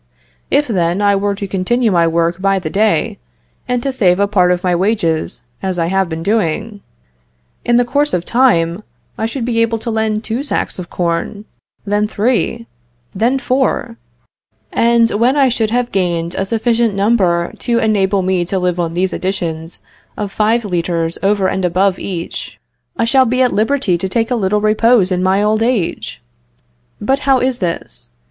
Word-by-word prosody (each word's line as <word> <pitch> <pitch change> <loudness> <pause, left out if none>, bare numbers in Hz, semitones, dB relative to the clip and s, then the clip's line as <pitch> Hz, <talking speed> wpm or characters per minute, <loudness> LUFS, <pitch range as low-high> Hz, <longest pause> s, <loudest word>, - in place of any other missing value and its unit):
If, 290 +1 +2
then, 180 -4 0
I 205 -1 +3
were 200 0 0
to 200 0 -5
continue 215 +5 0
to 170 -2 +3
work 170 +2 0
by 195 0 +2
the 170 -4 -4
day, 215 +2 +1 0.5
and 250 -1 -1
to 275 - -2
save 185 -7 +2
a 200 - +4
part 185 -3 +3
of 180 0 -1
my 180 -1 +2
wages, 170 - -1 0.2
as 190 -2 -2
I 165 - +1
have 190 -2 +1
been 160 0 -5
doing, 210 +1 -1 0.8
in 240 0 +3
the 245 - +3
course 290 +4 +1
of 175 -1 -1
time 200 -8 +2 0.3
I 220 - -2
should 235 +1 -4
be 230 -1 0
able 230 0 +1
to 230 +1 -4
lend 220 -1 -1
two 230 +4 -3
sacks 285 -8 -2
of 175 - -7
corn; 175 +4 -2 0.4
then 205 +1 +1
three; 230 +2 -1 0.5
then 235 +7 +1
four; 255 -3 -1 0.8
and 235 0 +3
when 240 +6 +2
I 270 -2 +4
should 225 -3 0
have 245 +1 -1
gained 170 -3 -1
a 195 - -2
sufficient 230 0 0
number 195 -5 +1
to 235 -2 0
enable 200 -3 +1
me 185 -1 +1
to 190 +3 -2
live 180 -1 -1
on 170 -1 -2
these 185 +1 0
additions 170 -3 -4 0.4
of 205 -2 -4
five 220 +3 +1
litres 170 -3 -2
over 195 -1 +2
and 190 0 -2
above 185 +2 +1
each, 175 -3 -5 0.4
I 230 - +1
shall 260 +3 +4
be 255 +2 +2
at 250 - +1
liberty 215 -5 +1
to 190 - -3
take 225 +4 -1
a - - +2
little 210 -1 0
repose 215 -1 +3
in 180 0 0
my 190 +2 +2
old 215 +1 +1
age. 225 - -2 0.8
But 265 +6 0
how 270 -2 +3
is 255 -1 -1
this? 170 - -4
205 Hz, 180 wpm, -16 LUFS, 180-230 Hz, 0.8 s, a